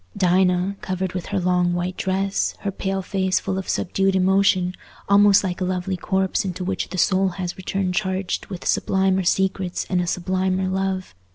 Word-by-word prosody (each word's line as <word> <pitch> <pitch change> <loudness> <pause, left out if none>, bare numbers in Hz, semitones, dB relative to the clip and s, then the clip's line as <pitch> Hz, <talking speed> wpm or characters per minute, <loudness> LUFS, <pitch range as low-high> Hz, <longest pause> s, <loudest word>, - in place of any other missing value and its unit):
Dinah, 185 +1 +2
covered 185 -1 -3
with 180 -2 -4
her 200 -1 -1
long 180 -1 +2
white 175 +1 -2
dress, 195 +1 -1
her 200 - -2
pale 195 0 -3
face 190 -1 0
full 190 -1 -2
of 190 - -7
subdued 195 +2 +1
emotion, 190 -1 +3 0.3
almost 200 0 +6
like 185 -1 -3
a - - +2
lovely 185 +1 -1
corpse 190 +1 0
into 185 -1 -4
which 190 - -2
the 185 - -5
soul 190 +2 +3
has 180 -2 -3
returned 190 0 -2
charged 190 0 -2
with 185 -3 -7
sublimer 190 0 +2
secrets 190 0 0
and 180 -1 +2
a 175 - -3
sublimer 185 +1 0
love. 190 - -2
190 Hz, 175 wpm, -22 LUFS, 180-195 Hz, 0.3 s, almost